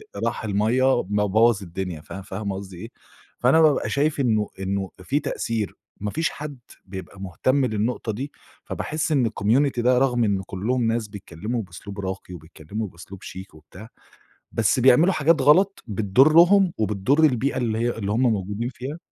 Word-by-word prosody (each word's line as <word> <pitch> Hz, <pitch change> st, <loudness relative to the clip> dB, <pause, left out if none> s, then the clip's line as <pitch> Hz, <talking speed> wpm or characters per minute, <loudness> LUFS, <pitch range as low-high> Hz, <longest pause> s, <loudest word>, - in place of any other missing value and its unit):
راح -, -, -2 dB
المَيَّة 115 Hz, +5 st, +2 dB
ب 105 Hz, +2 st, -5 dB
بوَّظ 105 Hz, +2 st, +3 dB
الدنيا، 90 Hz, -2 st, -5 dB
فا 95 Hz, +4 st, -8 dB
فاهمة 100 Hz, +1 st, -5 dB
قصدي 95 Hz, -2 st, -8 dB
إيه، 115 Hz, +6 st, -9 dB, 0.5 s
فأنا 135 Hz, +6 st, +4 dB
بابقى 155 Hz, -3 st, +3 dB
شايف 145 Hz, +1 st, 0 dB
إنه 110 Hz, -6 st, +1 dB
إنه 95 Hz, 0 st, -2 dB
فيه 145 Hz, +9 st, 0 dB
تأثير، 110 Hz, -4 st, -3 dB, 0.3 s
ما 105 Hz, 0 st, -2 dB
فيش 160 Hz, +6 st, 0 dB
حد 145 Hz, -3 st, -8 dB, 0.3 s
بيبقى 95 Hz, 0 st, -9 dB
مهتم 130 Hz, +9 st, 0 dB
للنقطة 110 Hz, +1 st, -2 dB
دي 130 Hz, +7 st, -5 dB, 0.3 s
فباحس 160 Hz, +2 st, -3 dB
إن 130 Hz, -6 st, +3 dB
الcommunity 120 Hz, +6 st, +1 dB
ده 125 Hz, +1 st, +3 dB
رغم 125 Hz, -2 st, +2 dB
إن 100 Hz, -3 st, +1 dB
كلهم 115 Hz, +8 st, -2 dB
ناس 115 Hz, -1 st, -1 dB
بيتكلموا 105 Hz, +3 st, -5 dB
بأسلوب 100 Hz, +2 st, -10 dB
راقي 95 Hz, -1 st, -5 dB
وبيتكلموا 85 Hz, +6 st, -7 dB
بأسلوب 90 Hz, +2 st, -12 dB
شيك 95 Hz, 0 st, -9 dB
وبتاع، 90 Hz, +8 st, -13 dB, 0.6 s
بس 115 Hz, +3 st, +1 dB
بيعملوا 135 Hz, +9 st, +5 dB
حاجات 155 Hz, +1 st, +3 dB
غلط 190 Hz, +7 st, +4 dB
بتضرهم 155 Hz, -, +5 dB
وبتضر 110 Hz, +8 st, +1 dB
البيئة 140 Hz, -2 st, +2 dB
اللي 115 Hz, -3 st, -1 dB
هي 120 Hz, 0 st, -1 dB
اللي 100 Hz, -2 st, -3 dB
هُم 115 Hz, +4 st, +1 dB
موجودين 110 Hz, 0 st, 0 dB
فيها، 130 Hz, +4 st, -7 dB
110 Hz, 160 wpm, -23 LUFS, 100-130 Hz, 0.6 s, بيعملوا